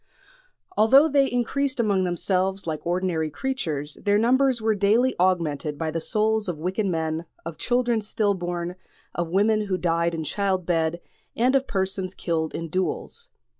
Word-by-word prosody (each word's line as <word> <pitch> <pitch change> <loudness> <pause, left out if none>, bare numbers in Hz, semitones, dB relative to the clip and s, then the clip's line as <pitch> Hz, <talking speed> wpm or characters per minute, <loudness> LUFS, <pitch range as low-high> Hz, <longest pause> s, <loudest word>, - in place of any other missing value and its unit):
Although 270 +8 +6
they 275 -2 +3
increased 260 +3 -1
among 200 -5 +2
themselves 185 +2 -1
like 160 0 -4
ordinary 175 -3 0
creatures, 155 - -3
their 205 -1 +3
numbers 255 +3 +3
were 220 0 +1
daily 215 +6 +3
augmented 160 -5 0
by 160 0 -2
the 165 +1 -3
souls 215 +1 0
of 170 - -3
wicked 185 +6 -1
men, 160 -2 -2 0.2
of 165 -1 -7
children 245 -2 +1
still 210 -1 0
born, 175 -1 -3 0.4
of 175 -1 -2
women 210 +4 +2
who 185 -2 0
died 170 -1 0
in 160 - -3
childbed, 175 -3 0 0.4
and 250 +3 +2
of 270 0 +2
persons 190 -1 -2
killed 160 -2 -2
in 165 - -4
duels. 190 - -3
190 Hz, 155 wpm, -24 LUFS, 170-220 Hz, 0.4 s, Although